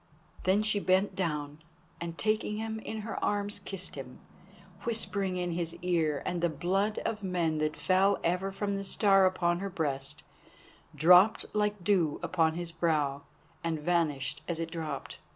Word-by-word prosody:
Then 195 Hz, +3 st, +3 dB
she 215 Hz, -1 st, +2 dB
bent 190 Hz, 0 st, +2 dB
down, 150 Hz, -5 st, -3 dB, 0.4 s
and 170 Hz, 0 st, -5 dB
taking 215 Hz, -1 st, 0 dB
him 220 Hz, 0 st, -3 dB
in 220 Hz, 0 st, -5 dB
her 220 Hz, +1 st, -5 dB
arms, 205 Hz, 0 st, +1 dB
kissed 195 Hz, -1 st, -5 dB
him, 130 Hz, -3 st, -8 dB, 0.7 s
whispering 200 Hz, -5 st, 0 dB
in 175 Hz, -1 st, -1 dB
his 170 Hz, -1 st, -3 dB
ear, 160 Hz, -5 st, +1 dB
and 175 Hz, -1 st, -2 dB
the 175 Hz, -, +2 dB
blood 190 Hz, +7 st, 0 dB
of 220 Hz, -2 st, -2 dB
men 175 Hz, -5 st, 0 dB
that 155 Hz, 0 st, -1 dB
fell 190 Hz, +2 st, +3 dB
ever 180 Hz, +3 st, 0 dB
from 200 Hz, +1 st, -2 dB
the 195 Hz, 0 st, -2 dB
Star 195 Hz, -1 st, +4 dB
upon 175 Hz, -2 st, +1 dB
her 200 Hz, +1 st, -3 dB
breast, 145 Hz, -5 st, -3 dB, 0.7 s
dropped 180 Hz, +8 st, +6 dB
like 210 Hz, -2 st, 0 dB
dew 170 Hz, -6 st, +2 dB
upon 160 Hz, -3 st, +2 dB
his 175 Hz, -1 st, -4 dB
brow, 150 Hz, -4 st, 0 dB, 0.4 s
and 165 Hz, -1 st, -1 dB
vanished 150 Hz, -4 st, 0 dB
as 170 Hz, -2 st, -2 dB
it 165 Hz, 0 st, -3 dB
dropped. 160 Hz, -2 st, -5 dB
180 Hz, 160 wpm, -30 LUFS, 160-200 Hz, 0.7 s, dropped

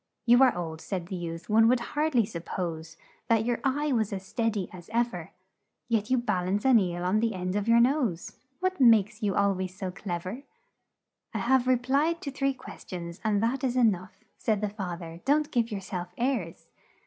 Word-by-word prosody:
"'You 240 Hz, +2 st, +6 dB
are 255 Hz, -7 st, +5 dB
old,' 160 Hz, -2 st, -5 dB
said 185 Hz, -4 st, -4 dB
the 190 Hz, -, -3 dB
youth; 170 Hz, -1 st, -6 dB
'one 225 Hz, +1 st, +5 dB
would 250 Hz, +1 st, +4 dB
hard 300 Hz, -1 st, 0 dB
ly 235 Hz, -, +5 dB
sup 170 Hz, -4 st, -6 dB
pose 165 Hz, -2 st, -5 dB, 0.3 s
That 225 Hz, -1 st, +3 dB
your 240 Hz, -1 st, 0 dB
eye 290 Hz, +2 st, 0 dB
was 220 Hz, -5 st, +1 dB
as 190 Hz, -1 st, -5 dB
stead 225 Hz, +2 st, -1 dB
y 195 Hz, -3 st, -2 dB
as 175 Hz, 0 st, -11 dB
ev 235 Hz, 0 st, +1 dB
er; 175 Hz, -1 st, -7 dB, 0.6 s
Yet 225 Hz, -1 st, +1 dB
you 255 Hz, -, +3 dB
bal 210 Hz, -7 st, -1 dB
ance 200 Hz, +4 st, -1 dB
an 255 Hz, -4 st, +7 dB
eel 175 Hz, -2 st, -2 dB
on 185 Hz, +4 st, +2 dB
the 225 Hz, -2 st, 0 dB
end 180 Hz, +1 st, -3 dB
of 205 Hz, +1 st, -1 dB
your 230 Hz, 0 st, +6 dB
nose 240 Hz, -, +1 dB, 0.2 s
What 370 Hz, -3 st, -1 dB
makes 225 Hz, -2 st, +5 dB
you 205 Hz, -3 st, 0 dB
al 200 Hz, 0 st, +3 dB
ways 185 Hz, -1 st, -4 dB
so 190 Hz, -2 st, -3 dB
clev 175 Hz, -2 st, -5 dB
er?' 220 Hz, +9 st, -5 dB, 0.9 s
"'I -, -, +1 dB
have 255 Hz, +1 st, +2 dB
re 255 Hz, -, +5 dB
plied 280 Hz, +7 st, +1 dB
to 280 Hz, -, -4 dB
three 275 Hz, 0 st, 0 dB
ques -, -, -11 dB
tions, 170 Hz, -1 st, -6 dB
and 215 Hz, -1 st, +1 dB
that 250 Hz, +4 st, 0 dB
is 255 Hz, -1 st, 0 dB
e 250 Hz, -, +4 dB
nough,' 185 Hz, -4 st, 0 dB, 0.2 s
Said 215 Hz, -2 st, 0 dB
the 210 Hz, -, 0 dB
fath 180 Hz, -4 st, -5 dB
er; 165 Hz, 0 st, -9 dB
'don't 295 Hz, +2 st, +2 dB
give 235 Hz, -2 st, +1 dB
your 205 Hz, -3 st, -4 dB
self 180 Hz, -1 st, -5 dB
airs! 235 Hz, -9 st, -2 dB
215 Hz, 225 wpm, -28 LUFS, 180-245 Hz, 0.9 s, an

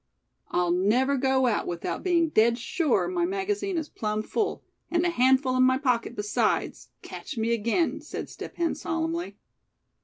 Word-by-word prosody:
"I'll 175 Hz, -1 st, +1 dB
never 225 Hz, +10 st, +2 dB
go 265 Hz, 0 st, +2 dB
out 230 Hz, -4 st, 0 dB
without 170 Hz, -1 st, -3 dB
being 340 Hz, -3 st, +2 dB
dead 235 Hz, -3 st, +3 dB
sure 280 Hz, +3 st, 0 dB
my 360 Hz, -1 st, -1 dB
magazine 390 Hz, +1 st, -1 dB
is 315 Hz, -2 st, -2 dB
plumb 215 Hz, -4 st, -3 dB
full; 420 Hz, -, -2 dB, 0.3 s
and 345 Hz, 0 st, +1 dB
a 350 Hz, -, +2 dB
handful 260 Hz, -2 st, +3 dB
in 255 Hz, -, +3 dB
my 260 Hz, 0 st, +4 dB
pocket 245 Hz, -4 st, 0 dB
besides, 210 Hz, -1 st, -1 dB
catch 280 Hz, -, -8 dB
me 225 Hz, +1 st, +1 dB
again," 235 Hz, -, 0 dB
said -, -, -6 dB
Step -, -, -9 dB
Hen, 340 Hz, -1 st, 0 dB
solemnly. 330 Hz, +1 st, -3 dB
265 Hz, 160 wpm, -26 LUFS, 230-340 Hz, 0.3 s, my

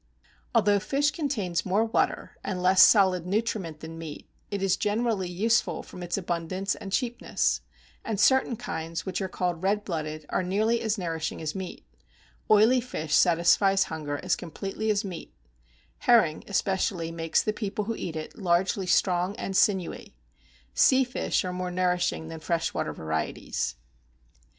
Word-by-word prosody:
Although 205 Hz, 0 st, +4 dB
fish 285 Hz, +8 st, +1 dB
contains 225 Hz, -, -2 dB
more 200 Hz, +4 st, +2 dB
water 225 Hz, -, -1 dB
and 185 Hz, -2 st, -3 dB
less 185 Hz, +1 st, +6 dB
solid 185 Hz, -5 st, +5 dB
nutriment 195 Hz, -6 st, -2 dB
than 165 Hz, 0 st, -8 dB
meat, 155 Hz, -3 st, -8 dB, 0.2 s
it 200 Hz, -1 st, -3 dB
is 195 Hz, -2 st, +3 dB
generally 210 Hz, -3 st, 0 dB
useful 220 Hz, +6 st, +1 dB
from 180 Hz, -, -11 dB
its 175 Hz, +1 st, -2 dB
abundance 185 Hz, +2 st, -2 dB
and 195 Hz, -, -8 dB
cheapness; 240 Hz, +2 st, 0 dB, 0.4 s
and 220 Hz, -3 st, -3 dB
certain 260 Hz, +1 st, +4 dB
kinds 165 Hz, -4 st, -5 dB
which 190 Hz, 0 st, -3 dB
are 190 Hz, -, -1 dB
called 180 Hz, -2 st, -2 dB
red 205 Hz, +2 st, 0 dB
blooded, 155 Hz, -3 st, -4 dB
are -, -, 0 dB
nearly 215 Hz, +6 st, +1 dB
as 220 Hz, 0 st, 0 dB
nourishing 165 Hz, -4 st, -3 dB
as 155 Hz, -2 st, -3 dB
meat: 190 Hz, -, -7 dB, 0.6 s
oily 220 Hz, +4 st, +5 dB
fish 160 Hz, -, -4 dB
satisfies 190 Hz, +3 st, +4 dB
hunger 145 Hz, -2 st, -4 dB
as 185 Hz, -, +2 dB
completely 195 Hz, +5 st, -4 dB
as 205 Hz, -1 st, +1 dB
meat; 175 Hz, -4 st, -8 dB, 0.6 s
herring, 215 Hz, -11 st, +3 dB
especially, 190 Hz, -3 st, 0 dB
makes 165 Hz, -1 st, 0 dB
the 215 Hz, -, 0 dB
people 210 Hz, -1 st, -3 dB
who 230 Hz, -, -2 dB
eat 165 Hz, -6 st, -5 dB
it 155 Hz, -1 st, -6 dB
largely 185 Hz, 0 st, +1 dB
strong 180 Hz, +1 st, +2 dB
and 195 Hz, -, -4 dB
sinewy. 190 Hz, -, +1 dB, 0.6 s
Sea 265 Hz, -, +5 dB
fish 250 Hz, -5 st, -1 dB
are 180 Hz, -, -3 dB
more 180 Hz, 0 st, -3 dB
nourishing 180 Hz, -2 st, 0 dB
than 165 Hz, 0 st, -7 dB
fresh 165 Hz, +1 st, -1 dB
water -, -, -2 dB
varieties. 80 Hz, -5 st, -3 dB
185 Hz, 155 wpm, -27 LUFS, 170-210 Hz, 0.6 s, less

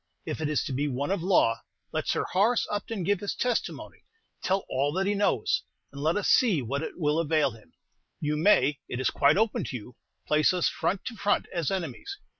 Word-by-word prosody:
"If -, -, -4 dB
it 155 Hz, -, 0 dB
is 150 Hz, -, +1 dB
to 145 Hz, -, -4 dB
be 140 Hz, +3 st, 0 dB
one 140 Hz, +4 st, -2 dB
of 195 Hz, -3 st, 0 dB
law, 170 Hz, -11 st, +3 dB, 0.3 s
let -, -, -2 dB
Sir -, -, +1 dB
Horace 215 Hz, +6 st, +2 dB
Upton 205 Hz, -1 st, -3 dB
give 200 Hz, +2 st, +1 dB
his 205 Hz, -, -3 dB
testimony, 245 Hz, -2 st, -2 dB, 0.4 s
tell 190 Hz, +1 st, 0 dB
all 140 Hz, +2 st, 0 dB
that 190 Hz, +2 st, 0 dB
he 205 Hz, -, +1 dB
knows, 200 Hz, -, +1 dB, 0.3 s
and 140 Hz, -, -8 dB
let 160 Hz, +5 st, +1 dB
us 205 Hz, -, -1 dB
see 215 Hz, -, +4 dB
what 135 Hz, +3 st, -2 dB
it -, -, -6 dB
will 150 Hz, -2 st, +1 dB
avail 155 Hz, -4 st, +2 dB
him. 110 Hz, -7 st, -17 dB, 0.5 s
You 150 Hz, 0 st, -1 dB
may 150 Hz, -5 st, +3 dB
it 125 Hz, -, -3 dB
is 130 Hz, -, +1 dB
quite 140 Hz, +5 st, +4 dB
open 220 Hz, +1 st, +1 dB
to -, -, -5 dB
you 125 Hz, +1 st, -8 dB, 0.3 s
place 150 Hz, +3 st, +3 dB
us 180 Hz, -2 st, +2 dB
front 195 Hz, 0 st, -1 dB
to 240 Hz, -, -5 dB
front 205 Hz, 0 st, +1 dB
as 170 Hz, -5 st, -1 dB
enemies. 190 Hz, -, -4 dB
165 Hz, 215 wpm, -27 LUFS, 140-200 Hz, 0.5 s, see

